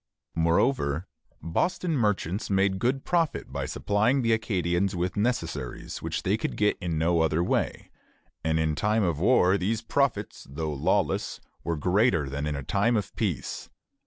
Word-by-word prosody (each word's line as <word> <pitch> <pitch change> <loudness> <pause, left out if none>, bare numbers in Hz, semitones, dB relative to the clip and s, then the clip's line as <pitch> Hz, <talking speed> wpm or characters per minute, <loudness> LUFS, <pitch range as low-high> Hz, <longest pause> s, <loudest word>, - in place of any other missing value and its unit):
Moreover, 85 - +1 0.4
Boston 170 - 0
merchants 105 - 0
made 95 -1 +2
good 130 +5 0
profit 170 -3 0
by - - -2
supplying 115 +6 +1
the 115 -1 +3
Acadians 95 -3 0
with 90 0 -1
necessaries 85 - -2
which - - -3
they 100 +3 +2
could - - -3
get 105 0 +3
in 85 -3 -2
no 85 +2 +2
other 80 +1 +2
way; - - -1 0.5
and 80 0 +1
in 80 -1 +1
time 105 +6 +1
of 85 -5 0
war 100 -2 +4
these 110 +4 -1
profits, 115 -4 -1
though 75 +2 -3
lawless, 70 - 0 0.2
were 85 -1 -1
greater 90 - +2
than 75 +2 -3
in 70 -3 -3
time 110 - +2
of 105 - -4
peace. - - -3
95 Hz, 155 wpm, -27 LUFS, 80-110 Hz, 0.5 s, war